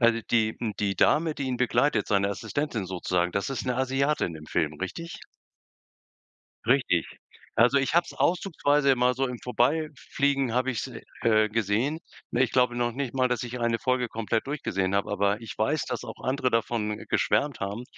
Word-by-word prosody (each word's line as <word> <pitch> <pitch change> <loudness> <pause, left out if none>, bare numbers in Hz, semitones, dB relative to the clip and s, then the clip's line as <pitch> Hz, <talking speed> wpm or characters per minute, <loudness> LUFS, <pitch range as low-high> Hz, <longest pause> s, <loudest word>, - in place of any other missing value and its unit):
Also, 115 -1 +4
die 110 -2 +2
m 110 -3 -2
die 100 -2 0
Dame, 155 0 +3
die 140 - -3
ihn 130 -1 -1
begleitet, 120 -2 +2
seine 100 -1 +2
Assistentin 115 +1 -3
sozusagen, 90 -1 -1
das 100 - -1
ist 135 - -3
'ne 125 -1 -1
Asiatin 135 - 0
im 75 0 -10
Film, 80 -1 0
richtig? 165 - -5 1.5
Richtig. 120 -10 +2 0.5
Also, 120 +5 +5
ich 135 - 0
habe 170 +1 +5
es - - -11
auszugsweise 150 -6 +2
immer 125 -1 +3
so 135 +1 0
im 125 - -5
Vorbeifliegen 140 0 0
habe 130 +1 +1
ich 115 - -3
es, - - -9 0.2
äh, 110 -2 +4
gesehen. 115 +8 0 0.3
Ne, 125 +2 +3
ich 120 - +1
glaube 125 -1 +3
noch 120 0 0
nicht 135 0 -4
mal, 130 -1 +2
dass 125 +1 -1
ich 120 0 -6
eine 115 -1 +1
Folge 125 -2 0
komplett 115 +2 -2
durchgesehen 95 -10 -1
habe, 100 - 0
aber 100 +2 +1
ich 115 - -8
weiß, 140 +8 +1
dass 125 -2 -4
auch - - -9
andere 130 0 +1
davon 115 -2 0
geschwärmt 145 -2 +1
haben, 100 +5 -4
120 Hz, 185 wpm, -27 LUFS, 110-135 Hz, 1.5 s, Also